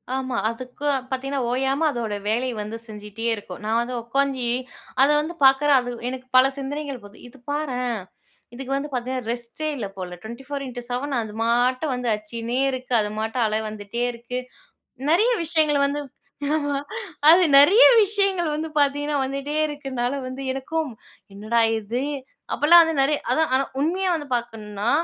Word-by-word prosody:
ஆமா. 260 -1 -2
அதுக்கு 250 +4 -7 0.3
பாத்தீங்கன்னா, 270 +1 -2
ஓயாம 270 +4 +1
அதோட 230 -5 -3
வேலை 240 +4 +1
வந்து 210 +2 -5
செஞ்சிட்டே 210 +1 -8
இருக்கும். 200 -3 -9
நான் 225 +2 +2
வந்து 250 +1 -4
உக்காந்து 265 0 0 0.5
அதவந்து 295 +4 +3
பார்க்குறேன் 275 +1 +6
அது 245 -1 -4 0.2
எனக்கு 255 0 -7
பல 255 - +8
சிந்தனைகள் 280 -1 -4
போது 205 +1 -14
இது 255 +3 -16
பாறேன். 250 -6 -2 0.5
இதுக்கு 265 +2 -7
வந்து 280 +2 -3
பாத்தீங்கன்னா, 255 +1 -2
ரெஸ்ட்டே 240 +6 -4
இல்ல 215 -5 -3
போல 180 -1 -6
24X7 255 +2 -5
அது 220 -2 -7
பாட்டு 245 +4 +2
வந்து 250 -1 -3
அச்சினே 230 +3 -4
இருக்கு. 255 -1 -5
அது 210 - -2
மாட்ட 220 +3 -3
அல 215 - -1
வந்துட்டே 215 +3 -4
இருக்கு. 240 +1 -5 0.7
நெறைய 420 +9 +4
விஷயங்கள 310 -3 +2
வந்து, 285 +1 -2 1.3
அது 350 +3 +7 0.2
நெறைய 380 - +8 0.2
விஷயங்கள 395 -3 +1
வந்து 315 +1 -4
பாத்தீங்கன்னா, 290 +1 +1
வந்துட்டே 275 +3 -3
இருக்குன்னால, 270 -4 -3 0.4
எனக்கும் 300 +3 -2 0.4
என்னடா 215 +4 0 0.2
இது? 235 +5 -3 0.5
அப்டிலாம் 340 +4 +7
வந்து 325 -4 0
நெறைய 290 +2 +2
அதான் 320 -4 +2
ஆனா 265 +1 +3 0.2
உண்மையா 365 +4 +1
வந்து 295 -3 -7
பாக்கணும்னா, 220 -2 -4
260 Hz, 140 wpm, -23 LUFS, 235-290 Hz, 1.3 s, பல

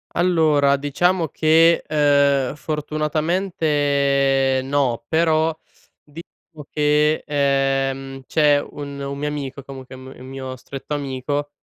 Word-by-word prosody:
Allora, 155 -5 +3
diciamo 165 +4 0
che, 165 +3 +3
uhm, 140 -3 +2
fortunatamente 145 -4 0
no, 130 -4 -1
però 160 0 +1 0.5
diciamo 155 0 -14
che, 150 +1 +1
uhm, 135 -2 -1
c'è 150 -2 +3
un 140 -1 -8
un 140 0 -5
mio 150 +1 -2
amico 140 -2 -5
comunque 130 -1 -11
un 130 - -12
m 130 - -10
un 130 - -11
mio 130 -1 -7
stretto 135 +3 -7
amico, 145 +1 -3
145 Hz, 115 wpm, -21 LUFS, 135-155 Hz, 0.5 s, Allora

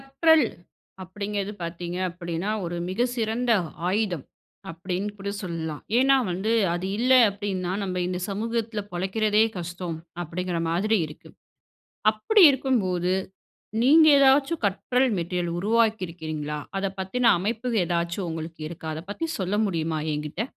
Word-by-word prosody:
கற்றல் 285 +2 +4 0.6
அப்படிங்கிறது 200 +1 -4
பாத்தீங்க 170 +1 -5
அப்படின்னா, 175 +2 -4 0.2
"ஒரு 170 +1 -4
மிக 220 +7 +1
சிறந்த 235 +1 0 0.4
ஆயுதம்" 190 -6 0 0.5
அப்டின்னு 180 +4 -3
கூட 200 0 -4
சொல்லலாம். 160 -4 -4 0.2
ஏன்னா 270 +2 +5 0.2
வந்து, 190 +5 -1 0.2
அது 175 +2 -3
இல்ல 255 +2 +4 0.2
அப்டின்னா, 195 -3 -3
நம்ப 185 -2 -3
இந்த 180 0 -2
சமூகத்துல 225 +1 -2
பொழைக்கிறதே 210 +4 +2
கஷ்டம். 175 -1 -5 0.3
அப்படிங்குற 175 +1 -3
மாதிரி 210 +7 +2
இருக்கு. 150 - -13 0.8
அப்படி 310 - +3
இருக்கும்போது, 190 -10 0 0.7
நீங்க 310 +5 +7
ஏதாச்சும் 275 +3 +4
கற்றல் 250 +6 +1
மெட்டீரியல் 175 0 -2
உருவாக்கி 220 +1 +2
இருக்கிறீங்களா? 155 -3 -5 0.2
அத 195 - -1
பத்தின 230 +5 +2
அமைப்பு 225 +6 -2
ஏதாச்சும் 170 +2 -2
உங்களுக்கு 160 0 -6
இருக்கா? 160 -1 -8
அத 155 - -5
பத்தி 330 - -3
சொல்ல 190 +2 0
முடியுமா 165 -4 -1
என்கிட்ட. 150 +5 -4
190 Hz, 125 wpm, -25 LUFS, 170-225 Hz, 0.8 s, நீங்க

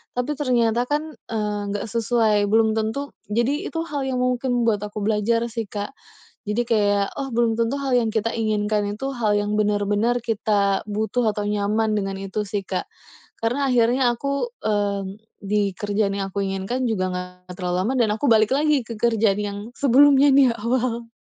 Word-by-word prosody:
Tapi 250 +4 -1
ternyata 240 -3 +1
kan, 300 +2 -1 0.2
eee, 210 -2 -2
enggak 200 0 -3
sesuai, 220 -2 +2
belum 220 +1 +3
tentu 220 +6 -2 0.2
jadi 235 +7 0
itu 325 - -3
hal 290 -5 -3
yang 255 -1 -1
mungkin 250 -1 0
membuat 220 -3 +2
aku 210 0 -6
belajar 220 +2 +1
sih, 225 -2 -4
Kak, 205 +4 -5 0.6
jadi 210 +3 0
kayak, 205 -2 +2
"Oh, 270 -2 -4
belum 230 -1 +2
tentu 230 +4 +1
hal 270 -2 0
yang 230 -2 +2
kita 220 +1 0
inginkan 215 -1 0
itu 270 +4 -4
hal 220 -3 +1
yang 205 0 0
benar-benar 210 +3 +1
kita 205 -3 +1
butuh 220 +4 -1
atau 210 - -2
nyaman", 210 +1 0
dengan 195 -1 -2
itu 195 +2 -3
sih, 200 0 -3
Kak, 185 - -2 0.5
karena 250 +5 0
akhirnya 245 +1 +3
aku, 280 - -2
mmm, 200 -1 -1 0.2
di 200 -1 0
kerjaan 205 -1 0
yang 195 -1 -3
aku 200 - -3
inginkan 195 +7 -2
juga 185 -4 -1
nggak 180 0 -7
terlalu 180 -1 -1
lama 245 +7 0
dan 225 -3 +3
aku 225 - -3
balik 220 +1 +4
lagi 300 0 +3
ke 230 0 -7
kerjaan 225 -3 +2
yang 200 -1 -4 0.2
sebelumnya 280 +1 +5
di 275 -1 +6
awal. 235 0 -2
220 Hz, 175 wpm, -23 LUFS, 205-245 Hz, 0.6 s, di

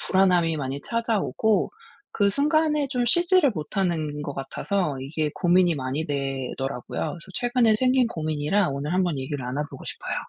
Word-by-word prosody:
불안함이 180 -4 +3
많이 135 0 -3
찾아오고 220 -3 +1 0.4
그 200 -1 +2
순간에 300 +3 +2
좀 250 -3 0
쉬지를 345 +2 +4
못하는 155 -2 -2
것 145 - -4
같아서 150 +3 -2
이게 150 +3 -2
고민이 175 -1 +3
많이 135 +3 -2
되더라고요. 135 -2 -3
그래서 170 0 -4
최근에 240 -2 +3
생긴 255 +1 +3
고민이라 155 +1 0
오늘 140 +4 -3
한번 180 -5 +1
얘기를 135 0 -4
나눠 135 +4 -2
보고 - - -10
싶어요. - - -5
175 Hz, 370 characters per minute, -25 LUFS, 145-225 Hz, 0.4 s, 쉬지를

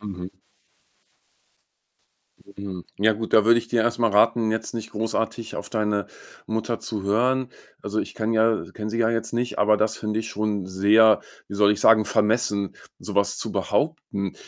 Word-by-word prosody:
Mhm. 95 -3 -7 2.2
Mhm. 95 -3 -7
Ja 110 +2 +4
gut, 110 +1 -6
da 110 - +6
würde 115 +1 +5
ich 115 0 -6
dir 115 -1 +2
erst 120 +1 0
mal 115 -2 +2
raten, 110 +2 +3
jetzt 110 +2 -3
nicht 115 -1 -5
großartig 115 +1 -3
auf - - -6
deine 105 -3 -1 0.4
Mutter 110 +1 -3
zu 110 -4 -4
hören. 125 +6 +1 0.3
Also, 105 +1 -2
ich - - -7
kann 110 0 -2
ja 110 0 +2
kenne 110 0 -5
sie 115 - -3
ja 115 -1 +2
jetzt 115 -1 -2
nicht, 120 +1 -2
aber 105 +1 +4
das 110 +1 0
finde 105 0 -2
ich 115 - -6
schon 105 -3 -2
sehr- 105 +4 +4 0.3
wie 100 - -7
soll 100 0 +4
ich 105 - -3
sagen- 110 -1 +6
vermessen, 105 -2 0 0.2
so - - -7
was 100 0 +1
zu - - -4
behaupten. 145 - -2
110 Hz, 180 wpm, -24 LUFS, 105-115 Hz, 2.2 s, da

